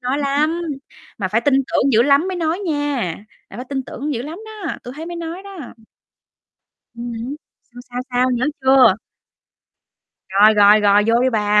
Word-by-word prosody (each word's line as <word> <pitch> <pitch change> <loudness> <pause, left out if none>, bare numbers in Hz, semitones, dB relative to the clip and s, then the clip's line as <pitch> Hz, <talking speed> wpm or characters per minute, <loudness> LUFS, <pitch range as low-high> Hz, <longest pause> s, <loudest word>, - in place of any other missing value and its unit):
nói 255 +3 -2
lắm, 300 +4 0 0.6
mà 190 -3 -2
phải 225 +4 +1
tin 285 +2 +2
tưởng 270 0 +1
dữ 225 +2 +5
lắm 285 +6 +3
mới 370 - -3
nói 330 +1 -1
nha, 290 - -2 0.5
là 195 - -10
phải 250 - -7
tin 270 -1 -3
tưởng 285 +3 -5
dữ 235 - -3
lắm 310 +6 -7
đó, 425 -6 -6
tui 245 - -8
thấy 320 +2 -7
mới 345 - -6
nói 340 +3 -6
đó. 395 -2 -11 1.4
Ừm 235 0 -6
hứm, 260 +5 -5 0.4
sao, 245 0 -12
sao, 245 - -4
sao? 250 +1 +1
Nhớ 245 0 0 0.2
chưa? 265 -5 +5 1.3
Rồi, 205 +3 +5
rồi, 210 +1 +6
rồi, 205 0 +4
vô 230 +1 +3
đi 260 - +2
bà. 210 -2 +2
265 Hz, 185 wpm, -19 LUFS, 235-310 Hz, 1.4 s, rồi